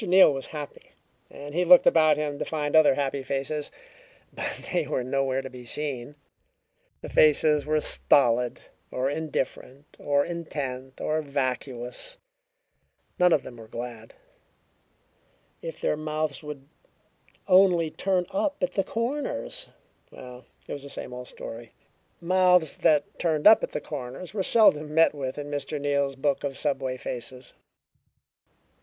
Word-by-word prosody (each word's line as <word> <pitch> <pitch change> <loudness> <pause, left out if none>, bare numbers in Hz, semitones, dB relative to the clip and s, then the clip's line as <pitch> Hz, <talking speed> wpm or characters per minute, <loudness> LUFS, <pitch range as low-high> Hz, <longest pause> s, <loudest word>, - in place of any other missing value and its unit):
Neal 185 -5 +6
was 135 -1 -5
happy, 150 -2 -9 0.4
and 145 +1 -10
he 175 +3 +1
looked 180 0 +7
about 155 -2 +5
him 145 -1 -3
to - - -1
find 150 -1 -2
other 155 -4 +6
happy 140 0 -1
faces. 140 +3 -3 0.6
But - - -5
they 170 -5 +1
were 130 -3 -1
nowhere 135 +1 -1
to 130 - -6
be 125 -1 -10
seen; 140 +1 -4 0.9
the - - -7
faces 150 0 +4
were 155 0 +2
stolid, 125 -5 +2 0.3
or 130 +2 -1
indifferent, 145 -2 -4
or 145 0 +1
intent, 135 -6 -5
or 155 +1 0
vacuous. 130 - -4 1.0
None 180 0 +5
of 145 - +3
them 120 - -10
were 115 -1 -12
glad. 115 -1 -8 1.5
If 165 - -7
their - - 0
mouths 155 -2 -3
would 150 -3 -9 0.8
only 180 -4 +5
turn 185 0 0
up 295 0 0
at 180 0 0
the 195 - +1
corners! 230 - -3 0.4
Well, 125 -1 -12 0.2
it - - -5
was 145 - -6
the 140 - -9
same 125 - -7
old 125 0 -7
story. 115 0 -9 0.5
Mouths 180 -2 +3
that 150 -2 +1
turned 155 -3 0
up 220 +1 +8
at - - -2
the - - -3
corners 140 +5 -7
were 205 - -1
seldom 155 -8 +4
met 165 -1 +5
with 135 -2 -5
in 145 0 -6
Mr. 145 +1 -3
Neal's 140 -1 0
book 140 +1 -1
of 140 -2 -3
subway 135 -3 -1
faces. 125 +1 -6
145 Hz, 145 wpm, -26 LUFS, 130-160 Hz, 1.5 s, up